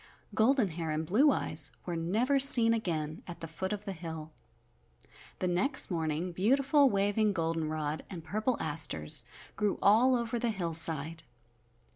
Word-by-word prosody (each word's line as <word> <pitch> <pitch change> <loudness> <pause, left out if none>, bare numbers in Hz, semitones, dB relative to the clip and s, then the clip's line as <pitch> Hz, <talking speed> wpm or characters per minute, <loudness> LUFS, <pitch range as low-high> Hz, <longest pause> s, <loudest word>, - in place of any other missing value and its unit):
Golden 225 0 +2
Hair 165 -1 -5
and 155 +1 -3
Blue 240 - +3
Eyes - - 0
were 175 - -4
never 220 +12 0
seen 235 -4 +7
again 160 -7 -4
at 175 - -9
the 165 - -7
foot 190 +4 -6
of 210 0 -5
the 200 - -4
hill. 160 -2 -8 1.1
The 185 - -2
next 190 +8 +1
morning 165 +1 -3
beautiful, 270 - +2
waving 205 0 0
golden 165 -2 -2
rod 155 -1 -4
and 175 -4 -9
purple 215 +9 -2
asters 115 - 0 0.3
grew 210 -2 -1
all 240 +6 +4
over 235 0 -3
the 235 - -1
hillside. 165 -4 +1
185 Hz, 150 wpm, -30 LUFS, 160-225 Hz, 1.1 s, seen